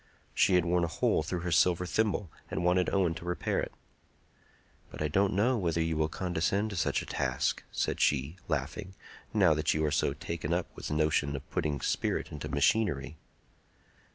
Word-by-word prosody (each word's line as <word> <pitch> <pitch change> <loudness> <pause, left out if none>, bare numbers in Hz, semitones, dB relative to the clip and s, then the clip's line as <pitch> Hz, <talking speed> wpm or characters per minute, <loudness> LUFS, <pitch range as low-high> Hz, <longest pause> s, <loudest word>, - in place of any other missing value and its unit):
She 95 - +4
had 90 -2 +3
worn 85 0 +2
a - - +1
hole 80 - +1
through 85 +3 -3
her 90 0 -3
silver 90 +2 +3
thimble, 105 -2 0 0.2
and - - -2
wanted 90 +1 +3
Owen 95 -4 +2
to 85 - -8
repair 90 0 -1
it. - - -3 1.2
"But - - -10
I 75 - +1
don't 95 +6 +2
know 115 +5 +2
whether 85 -3 0
you 80 0 0
will 75 0 +1
condescend 95 +5 -1
to - - -5
such 85 - 0
a - - -9
task," 65 -1 -1
said - - -1
she, 70 +3 +2
laughing, 80 +6 -3 0.4
"now 95 -7 +4
that 75 0 +1
you 80 0 +1
are 75 - 0
so 70 - +1
taken 85 0 -3
up 85 0 -2
with - - -6
the 75 - -2
notion 75 -2 +1
of 70 +1 -7
putting 75 -5 -1
spirit - - -1
into 75 - -6
machinery." 75 -2 +1
85 Hz, 190 wpm, -30 LUFS, 75-90 Hz, 1.2 s, She